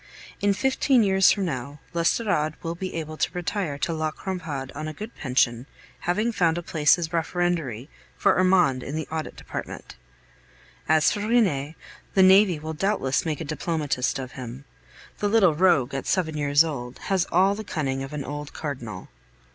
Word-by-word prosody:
In 205 Hz, 0 st, +2 dB
fifteen 265 Hz, 0 st, +3 dB
years 190 Hz, -1 st, +5 dB
from 200 Hz, -2 st, 0 dB
now, 140 Hz, -2 st, -5 dB
l'Estorade 170 Hz, -2 st, +1 dB
will 165 Hz, 0 st, -2 dB
be 185 Hz, +2 st, -5 dB
able 155 Hz, -1 st, -5 dB
to -, -, 0 dB
retire 180 Hz, -4 st, -2 dB
to 165 Hz, -, -1 dB
La 155 Hz, -1 st, -1 dB
Crampade 155 Hz, -6 st, -5 dB
on 155 Hz, +2 st, -5 dB
a 155 Hz, -, -5 dB
good 215 Hz, +9 st, -8 dB
pension, 125 Hz, -2 st, 0 dB, 0.3 s
having 210 Hz, +7 st, 0 dB
found 170 Hz, -6 st, +1 dB
a 175 Hz, -, -4 dB
place 155 Hz, -1 st, +3 dB
as 170 Hz, -2 st, -3 dB
referendary 165 Hz, -7 st, -1 dB, 0.3 s
for -, -, +3 dB
Armand 180 Hz, -8 st, +3 dB
in 140 Hz, -, -5 dB
the 160 Hz, -1 st, -3 dB
Audit 160 Hz, -1 st, -4 dB
Department. -, -, -7 dB, 0.9 s
As 155 Hz, -1 st, +4 dB
for 205 Hz, -, -2 dB
Rene, 195 Hz, -, +1 dB, 0.4 s
the 190 Hz, -, +6 dB
navy 190 Hz, -2 st, +6 dB
will 155 Hz, +1 st, -5 dB
doubtless 160 Hz, -5 st, 0 dB
make 155 Hz, 0 st, -2 dB
a -, -, -4 dB
diplomatist 150 Hz, -4 st, -1 dB
of 130 Hz, -1 st, -6 dB
him. 130 Hz, +1 st, -8 dB, 0.5 s
The 205 Hz, -, +1 dB
little 200 Hz, -6 st, +5 dB
rogue, 150 Hz, -6 st, +3 dB
at 135 Hz, -, -4 dB
seven 165 Hz, -5 st, 0 dB
years 145 Hz, 0 st, +4 dB
old, 125 Hz, -6 st, -5 dB
has 190 Hz, -2 st, +2 dB
all 190 Hz, +3 st, +4 dB
the 215 Hz, +2 st, -5 dB
cunning 135 Hz, -9 st, -2 dB
of 135 Hz, +1 st, -6 dB
an 150 Hz, -2 st, -4 dB
old 145 Hz, +1 st, -6 dB
Cardinal. 120 Hz, -, -6 dB
160 Hz, 175 wpm, -25 LUFS, 140-185 Hz, 0.9 s, the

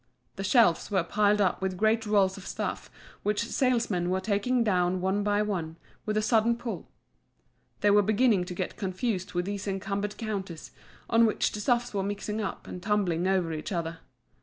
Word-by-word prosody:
The 195 Hz, -, -5 dB
shelves 195 Hz, -5 st, +3 dB
were 190 Hz, -4 st, +1 dB
piled 210 Hz, +3 st, +2 dB
up 190 Hz, -2 st, +1 dB
with 190 Hz, -1 st, -2 dB
great 220 Hz, +2 st, +2 dB
rolls 195 Hz, -2 st, +3 dB
of 195 Hz, -, -10 dB
stuff -, -, -4 dB, 0.3 s
which 210 Hz, +2 st, 0 dB
the 230 Hz, -, -6 dB
salesmen 230 Hz, -9 st, +1 dB
were 185 Hz, +1 st, +1 dB
taking 220 Hz, +5 st, +1 dB
down 180 Hz, -3 st, +1 dB
one 190 Hz, +2 st, 0 dB
by 205 Hz, 0 st, +1 dB
one, 175 Hz, -6 st, -3 dB, 0.3 s
with 215 Hz, 0 st, 0 dB
a 215 Hz, -, +1 dB
sudden 230 Hz, +1 st, +3 dB
pull. 235 Hz, -1 st, -6 dB, 0.9 s
They 205 Hz, -, +4 dB
were 205 Hz, +1 st, +6 dB
beginning 210 Hz, -2 st, +3 dB
to 180 Hz, 0 st, -6 dB
get 185 Hz, 0 st, -4 dB
confused 190 Hz, 0 st, -2 dB
with 175 Hz, 0 st, 0 dB
these 200 Hz, 0 st, -4 dB
encumbered 200 Hz, +1 st, -3 dB
counters, 195 Hz, -7 st, -5 dB, 0.4 s
on 230 Hz, 0 st, +5 dB
which 215 Hz, -, 0 dB
the 210 Hz, -, -5 dB
stuffs 240 Hz, +2 st, +1 dB
were 200 Hz, -, 0 dB
mixing 205 Hz, +2 st, -3 dB
up 200 Hz, -, -5 dB
and 180 Hz, -, -7 dB
tumbling 185 Hz, -4 st, +1 dB
over 185 Hz, -4 st, +1 dB
each 155 Hz, +4 st, -5 dB
other. 165 Hz, -2 st, -3 dB
200 Hz, 185 wpm, -28 LUFS, 185-215 Hz, 0.9 s, were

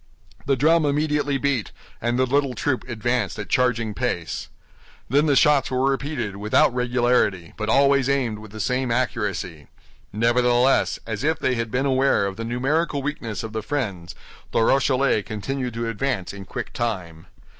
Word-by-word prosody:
The 140 Hz, -, +3 dB
drum 160 Hz, +5 st, +3 dB
immediately 145 Hz, -1 st, +1 dB
beat, 135 Hz, -5 st, -1 dB, 0.3 s
and 120 Hz, +1 st, 0 dB
the 130 Hz, -, +3 dB
little 135 Hz, 0 st, +1 dB
troop 130 Hz, -4 st, -1 dB
advanced 120 Hz, -4 st, -1 dB
at 105 Hz, -, -6 dB
charging 115 Hz, -4 st, +1 dB
pace. 100 Hz, -8 st, -3 dB, 0.6 s
Then 145 Hz, +5 st, +3 dB
the 145 Hz, -, +3 dB
shots 145 Hz, 0 st, +4 dB
were 130 Hz, +1 st, +1 dB
repeated 135 Hz, -7 st, -3 dB
without 105 Hz, +4 st, +3 dB
regularity, 120 Hz, -8 st, +1 dB
but 110 Hz, 0 st, -3 dB
always 140 Hz, +1 st, +4 dB
aimed 125 Hz, -6 st, 0 dB
with 110 Hz, 0 st, -11 dB
the 110 Hz, +2 st, -10 dB
same 125 Hz, +3 st, 0 dB
accuracy. 105 Hz, -, -2 dB, 0.4 s
Nevertheless, 120 Hz, +3 st, +2 dB
as 110 Hz, +1 st, -4 dB
if 160 Hz, +2 st, +1 dB
they 130 Hz, -, 0 dB
had 115 Hz, -2 st, -2 dB
been 125 Hz, +5 st, 0 dB
aware 135 Hz, -5 st, +2 dB
of 100 Hz, -1 st, -3 dB
the 115 Hz, -, -5 dB
numerical 140 Hz, +5 st, 0 dB
weakness 115 Hz, -8 st, -4 dB
of 110 Hz, -1 st, -6 dB
the 110 Hz, -, -2 dB
friends, 100 Hz, -9 st, -4 dB, 0.3 s
the -, -, +1 dB
Rochellais 135 Hz, -2 st, +3 dB
continued 125 Hz, +4 st, -4 dB
to 115 Hz, 0 st, -2 dB
advance 115 Hz, -4 st, -2 dB
in 100 Hz, -1 st, -9 dB
quick -, -, -6 dB
time. 90 Hz, -9 st, -4 dB
125 Hz, 165 wpm, -23 LUFS, 110-135 Hz, 0.6 s, shots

